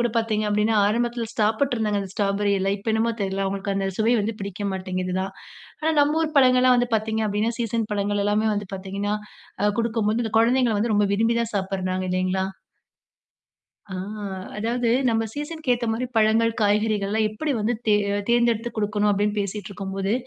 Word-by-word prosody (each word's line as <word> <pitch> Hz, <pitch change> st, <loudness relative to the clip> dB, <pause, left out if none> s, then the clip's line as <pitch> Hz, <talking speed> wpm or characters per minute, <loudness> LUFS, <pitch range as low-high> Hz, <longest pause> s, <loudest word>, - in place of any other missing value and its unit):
கூட 240 Hz, -, +2 dB
பார்த்தீங்க 220 Hz, -2 st, +1 dB
அப்படின்னா, 210 Hz, +2 st, +2 dB
ஆரம்பத்தில 235 Hz, +2 st, 0 dB
சாப்பிட்ருந்தாங்க 220 Hz, -1 st, +1 dB
அந்த 195 Hz, -, -5 dB
ஸ்ட்ராபெர்ரியெல்லாம். 200 Hz, -1 st, +1 dB
இப்ப 210 Hz, +3 st, -3 dB
என்னமோ 225 Hz, +1 st, +1 dB
தெரில, 195 Hz, 0 st, -1 dB
அவங்களுக்கு 195 Hz, +1 st, -2 dB
அந்த 195 Hz, 0 st, 0 dB
சுவை 225 Hz, +2 st, +3 dB
வந்து 210 Hz, +2 st, -1 dB
பிடிக்க 200 Hz, 0 st, -5 dB
மாட்டேங்குது 185 Hz, -1 st, -3 dB
தான். 190 Hz, 0 st, -4 dB, 0.5 s
ஆனா 320 Hz, -, +2 dB
நம்ம 295 Hz, +2 st, +3 dB
ஊர் 310 Hz, -1 st, -3 dB
பழங்கள்லாம் 255 Hz, -1 st, +5 dB
வந்து 245 Hz, 0 st, +1 dB
பார்த்தீங்க 220 Hz, 0 st, 0 dB
அப்படின்னா, 210 Hz, +3 st, 0 dB
சீசன் 230 Hz, -1 st, -1 dB
பழங்கள் 205 Hz, 0 st, 0 dB
எல்லாமே 210 Hz, +1 st, +2 dB
வந்து 205 Hz, -1 st, -4 dB
பார்த்தீங்கன்னா, 195 Hz, +2 st, -3 dB, 0.5 s
அ 210 Hz, -, +4 dB
குடுக்கும்போது 225 Hz, 0 st, 0 dB
இந்த 220 Hz, -, -4 dB
கொழந்தைங்கள் 235 Hz, -1 st, +3 dB
வந்து 220 Hz, +2 st, 0 dB
ரொம்ப 205 Hz, 0 st, +3 dB
விரும்பிதான் 230 Hz, +2 st, +1 dB
சாப்பிடுறாங்க. 185 Hz, -1 st, -2 dB
இல்லைங்களா? 185 Hz, +1 st, 0 dB, 1.4 s
அ 190 Hz, -, -6 dB, 0.6 s
"அதாவது, 235 Hz, +3 st, -1 dB, 0.2 s
நம்ம 225 Hz, -1 st, +2 dB
சீசனுக்கு 295 Hz, 0 st, -4 dB
ஏத்த 235 Hz, -1 st, -3 dB
மாரி 240 Hz, +3 st, -2 dB
பழங்கள் 225 Hz, +1 st, +4 dB
காய்கறிகள்லாம் 210 Hz, 0 st, +1 dB
எப்படி 285 Hz, +8 st, -2 dB
வந்து 215 Hz, +3 st, 0 dB
தேர் 210 Hz, -1 st, +4 dB
அ -, -, 0 dB
தேர்ந்தெடுத்து 235 Hz, -1 st, +2 dB
குடுக்கணும்." 210 Hz, -1 st, +1 dB
அப்படின்னு 205 Hz, +1 st, +1 dB
பேசிட்டு 200 Hz, +1 st, -3 dB
இருக்கும்போது, 195 Hz, +1 st, -3 dB
215 Hz, 165 wpm, -24 LUFS, 200-230 Hz, 1.4 s, பழங்கள்லாம்